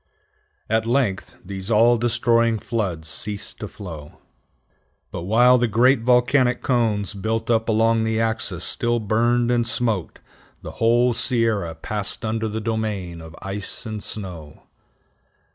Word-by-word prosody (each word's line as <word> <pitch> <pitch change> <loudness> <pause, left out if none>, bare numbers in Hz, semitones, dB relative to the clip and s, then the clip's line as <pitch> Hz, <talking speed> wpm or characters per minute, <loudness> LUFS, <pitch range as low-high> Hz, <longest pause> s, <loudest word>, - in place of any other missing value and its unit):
At 110 +1 0
length 120 -6 0
these 95 +1 -7
all 115 +2 +5
destroying 115 -1 +2
floods 100 -8 -3
ceased 100 +4 -5
to - - -5
flow. 80 -7 -10 0.9
But 85 - -5
while 125 +5 +5
the 120 - +2
great 120 +4 +4
volcanic 125 +2 +2
cones 110 -6 0
built 110 +3 -2
up 115 0 +1
along 115 +1 +3
the 110 0 0
axis 110 -6 -1
still 120 0 +1
burned 120 +3 +1
and 120 -1 +1
smoked, 110 -7 -1 0.4
the - - -6
whole 120 +2 +4
Sierra 115 -8 +1
passed 105 +6 -3
under 110 0 -1
the 110 +1 -3
domain 105 -6 -3
of 80 0 -11
ice 100 +4 -5
and 110 -2 -5
snow. 90 -8 -7
110 Hz, 135 wpm, -22 LUFS, 100-120 Hz, 0.9 s, all